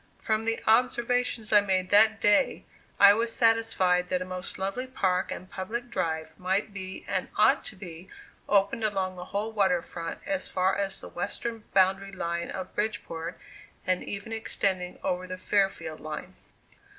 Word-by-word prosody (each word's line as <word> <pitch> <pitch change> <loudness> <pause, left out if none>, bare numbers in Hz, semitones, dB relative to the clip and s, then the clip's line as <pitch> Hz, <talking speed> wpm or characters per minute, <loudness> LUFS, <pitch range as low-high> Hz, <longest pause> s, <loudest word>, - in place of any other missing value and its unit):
From 220 0 -1
the 225 0 +1
observations 240 -1 +2
I 210 - +8
made 185 -2 0
that 220 +2 +6
day, 205 +6 +3 0.3
I 200 0 +9
was 230 +2 0
satisfied 210 -7 +2
that 180 - +1
a 185 - -4
most 185 0 -4
lovely 195 +7 -3
park 185 -8 0
and 185 - -6
public 235 +7 -5
drive 160 -7 -2
might 190 +3 0
be, 190 -1 -7
and - - -1
ought - - +5
to - - -4
be 180 -1 -10 0.4
opened 200 +2 +3
along 190 -3 0
the 180 0 -7
whole 205 +4 -3
water 190 -5 +2
front 165 -1 -6
as 290 -1 -2
far 185 +1 +1
as 195 -1 -2
the - - -9
western 225 +5 -4
boundary 195 +1 +3
line 170 -1 -3
of 185 -1 -6
Bridgeport, 180 -6 -3 0.5
and 185 -1 +1
even 205 +2 -6
extending 190 -4 -1
over 180 0 -1
the 185 0 -5
Fairfield 190 -5 0
line. 155 +4 -6
195 Hz, 160 wpm, -28 LUFS, 185-220 Hz, 0.5 s, I